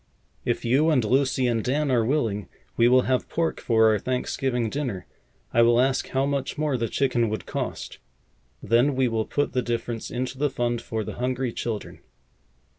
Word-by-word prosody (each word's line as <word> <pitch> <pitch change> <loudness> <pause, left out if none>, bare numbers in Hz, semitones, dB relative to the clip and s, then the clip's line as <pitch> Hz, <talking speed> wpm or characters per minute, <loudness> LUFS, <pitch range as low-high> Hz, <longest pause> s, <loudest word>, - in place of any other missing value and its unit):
If - - -1
you 135 +7 +3
and 130 -8 +2
Lucy 130 +2 +2
and 115 -3 +1
Dan 145 +2 0
are 120 -3 +3
willing, 110 - -1 0.3
we 115 - +4
will 130 +1 +5
have 130 0 0
pork 165 0 -1
for 110 -1 +4
our 105 - +1
Thanksgiving 125 0 -1
dinner. 120 -6 -3 0.5
I 115 - +5
will 120 0 +5
ask 130 +1 +1
how 135 +1 0
much 140 -1 -2
more 150 -2 0
the 115 -2 -1
chicken 120 -3 +1
would 110 - -4
cost. - - -5 0.6
Then 125 +5 +3
we 130 -1 +2
will 110 -2 -1
put 145 - -1
the 130 - +1
difference 120 -1 -3
into 130 +1 -4
the 145 0 +2
fund 120 -2 -1
for 110 -1 -3
the - - -7
hungry 125 -1 -1
children." 110 -3 -5
125 Hz, 185 wpm, -25 LUFS, 115-135 Hz, 0.6 s, will